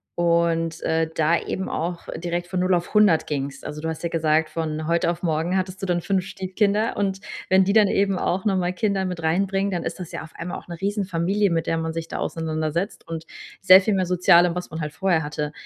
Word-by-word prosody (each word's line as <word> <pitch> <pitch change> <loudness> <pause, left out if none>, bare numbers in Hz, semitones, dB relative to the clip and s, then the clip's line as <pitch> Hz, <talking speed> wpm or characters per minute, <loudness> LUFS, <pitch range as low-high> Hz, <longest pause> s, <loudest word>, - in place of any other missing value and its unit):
und, 170 -1 +1
äh, 160 0 +1
da 160 +2 +3
eben 190 - -4
auch 170 +1 -4
direkt 175 +1 -3
von 180 +1 -3
0 185 0 +3
auf 175 0 -3
100 210 -7 +5
gingst. 140 -2 -4
Also, 150 0 -6
du 160 - -2
hast 160 0 -6
ja 170 - -1
gesagt, 155 -1 +1
„von 155 -1 -3
heute 170 +1 +1
auf 170 +1 -3
morgen 165 +2 0
hattest 185 0 -3
du 195 - -3
dann 175 -1 +1
5 190 +1 0
Stiefkinder“ 200 +3 0
und 195 -1 -1 0.3
wenn 190 0 +5
die 200 +1 +1
dann 215 -2 +6
eben 195 -1 +1
auch 185 +3 -1
noch 200 -2 +2
mal 180 -1 0
Kinder 195 -1 0
mit 180 -3 -4
reinbringen, 195 +4 +1
dann 175 -2 -1
ist - - -5
das 180 -3 -7
ja - - -5
auf 160 - -10
einmal 170 +2 -5
auch - - -20
'ne 170 -2 -8
riesen 200 +1 -1
Familie, 195 +3 +1
mit 165 -1 0
der 165 - 0
man 160 0 -3
sich 165 0 -4
da - - -4
auseinandersetzt 160 +3 -3
und 165 -1 -6 0.3
sehr 190 0 +8
viel 210 +1 +1
mehr 185 -1 +1
Sozialem, 175 -1 +4
was 180 +1 -5
man 160 0 -5
halt 150 -1 -4
vorher 175 -2 +1
hatte. 150 0 -3
175 Hz, 240 wpm, -23 LUFS, 160-190 Hz, 0.3 s, sehr